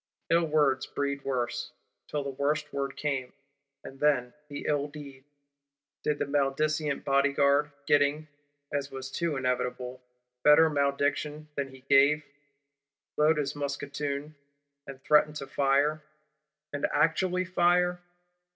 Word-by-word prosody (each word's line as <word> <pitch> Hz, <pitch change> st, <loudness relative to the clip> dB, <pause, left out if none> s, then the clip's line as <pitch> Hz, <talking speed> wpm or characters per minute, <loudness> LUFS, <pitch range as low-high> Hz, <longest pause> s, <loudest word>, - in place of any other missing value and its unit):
Ill 170 Hz, 0 st, +4 dB
words 145 Hz, -4 st, +2 dB
breed 140 Hz, 0 st, -3 dB
worse: 125 Hz, -3 st, -2 dB, 0.3 s
till 145 Hz, -1 st, -2 dB
the 140 Hz, -, -4 dB
worst 145 Hz, +2 st, -1 dB
word 140 Hz, -1 st, -3 dB
came; 135 Hz, -4 st, -2 dB, 0.5 s
and 135 Hz, -, -10 dB
then 125 Hz, -5 st, +2 dB
the 145 Hz, -1 st, -7 dB
ill 145 Hz, -1 st, +1 dB
deed. 145 Hz, -3 st, -11 dB, 0.8 s
Did 150 Hz, -1 st, 0 dB
the 145 Hz, -, -1 dB
maledicent 145 Hz, +1 st, 0 dB
Bodyguard, 140 Hz, +1 st, +3 dB, 0.2 s
getting 145 Hz, +2 st, +2 dB, 0.5 s
(as 140 Hz, -1 st, -1 dB
was 135 Hz, 0 st, -7 dB
too 170 Hz, -1 st, -1 dB
inevitable) 125 Hz, 0 st, -2 dB, 0.4 s
better 155 Hz, +3 st, +6 dB
malediction 145 Hz, +1 st, -1 dB
than 140 Hz, -1 st, -2 dB
he 130 Hz, 0 st, -14 dB
gave, 140 Hz, +3 st, +4 dB, 0.9 s
load 150 Hz, +1 st, +3 dB
his 145 Hz, -2 st, -1 dB
musketoon, 145 Hz, +1 st, -4 dB, 0.5 s
and 135 Hz, -1 st, -9 dB
threaten 150 Hz, 0 st, +4 dB
to 145 Hz, -2 st, -6 dB
fire; 140 Hz, +3 st, +1 dB, 0.7 s
and 145 Hz, -, 0 dB
actually 180 Hz, +2 st, +1 dB
fire? 180 Hz, 0 st, +2 dB
145 Hz, 125 wpm, -29 LUFS, 135-150 Hz, 0.9 s, better